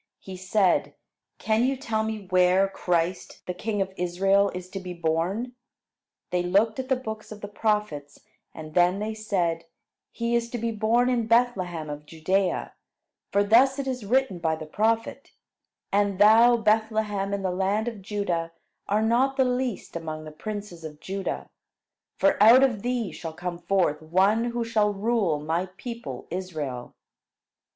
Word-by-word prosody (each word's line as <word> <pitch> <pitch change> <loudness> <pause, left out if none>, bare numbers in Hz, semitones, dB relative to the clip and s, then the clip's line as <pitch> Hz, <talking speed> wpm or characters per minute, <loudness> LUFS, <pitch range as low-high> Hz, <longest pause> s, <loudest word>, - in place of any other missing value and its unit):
He 190 - -9
said: 185 +1 +1 0.4
"Can 220 +1 +1
you 265 +1 +1
tell 220 -4 -1
me 220 -2 -4
where 185 +1 +4
Christ, 180 -2 -2
the 180 - -3
king 205 +2 -1
of 190 0 -11
Israel, 195 +3 +2
is 180 0 -6
to 195 - -4
be 180 -1 -7
born?" 170 +9 -1 0.8
They 180 - +1
looked 200 +6 +2
at 260 0 -4
the 265 - +4
books 220 -4 -7
of 210 -1 -9
the 205 - -5
prophets, 205 -9 -2 0.3
and 155 -1 -10
then 180 +2 +3
they 215 +2 -3
said: 180 -7 -1 0.5
"He 235 0 -2
is 235 0 0
to 240 - -4
be 230 0 -2
born 225 +3 +2
in 240 -3 0
Bethlehem 195 -9 +1
of 150 0 -7
Judea; 185 +4 -1 0.6
for 200 - +3
thus 250 +6 +5
it 275 - -3
is 255 -3 -3
written 250 -3 +1
by 160 -1 0
the 160 0 -8
prophet, 225 - -1 0.6
'And 200 -1 +2
thou 225 +4 +6
Bethlehem 215 -2 0
in 200 -1 -2
the 185 - 0
land 195 +4 0
of 225 -4 -5
Judah 180 -5 -2 0.3
are 210 +2 +1
not 255 +5 +2
the 265 - +4
least 250 -6 -2
among 155 -2 -5
the 155 - -9
princes 205 0 -7
of 150 -1 -8
Judah; 195 +3 -4 0.7
for 290 -7 +2
out 235 +5 +8
of 240 -7 +1
thee 245 -2 -2
shall 165 -2 -7
come 175 +1 -5
forth 175 -6 +1
one 190 +8 +2
who 240 -1 -2
shall 215 -2 +2
rule 200 -7 +1
my 165 +5 -1
people 230 - -7
Israel.'" 155 -9 -5
200 Hz, 165 wpm, -26 LUFS, 175-225 Hz, 0.8 s, out